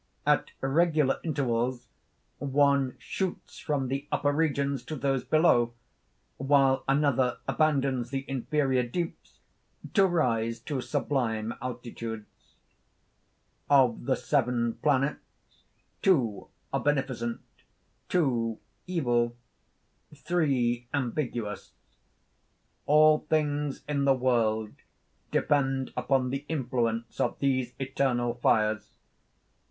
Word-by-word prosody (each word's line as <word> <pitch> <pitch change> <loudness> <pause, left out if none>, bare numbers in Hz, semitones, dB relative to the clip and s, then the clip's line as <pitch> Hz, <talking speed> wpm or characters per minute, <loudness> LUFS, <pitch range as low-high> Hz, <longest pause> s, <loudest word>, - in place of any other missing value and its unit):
At - - +2
regular 150 0 +2
intervals 125 -5 -1 0.5
one 140 -2 +2
shoots 190 -2 -5
from 140 -4 -1
the 135 +3 -3
upper 145 - +1
regions 140 -3 0
to 155 - -5
those 135 -2 0
below; 120 -5 +3 0.6
while 135 -1 +3
another 135 -3 +2
abandons 135 -6 +1
the 135 0 -3
inferior 135 0 0
deeps 165 +8 -5 0.6
to 195 -2 +5
rise 115 -10 0
to 135 0 -3
sublime 120 -6 -1
altitudes... 115 -3 -6 1.4
"Of 130 -5 +4
the 130 - +2
seven 120 -4 0
planets, 140 -1 -2 0.4
two 130 - +2 0.3
are - - +1
beneficent; 130 -5 -1 0.7
two 120 -10 +1 0.3
evil; 120 -9 0 0.8
three 130 -8 0
ambiguous: 120 -5 -3 1.1
all 155 +1 +6
things 150 -2 0
in 140 -2 0
the 135 -1 +5
world 110 -4 +1 0.6
depend 135 -2 +1
upon 130 -2 +1
the 135 +1 -3
influence 120 -6 -2
of - - 0
these 130 -3 0
eternal 130 -3 0
fires. 110 -3 +1
135 Hz, 95 wpm, -28 LUFS, 120-145 Hz, 1.4 s, all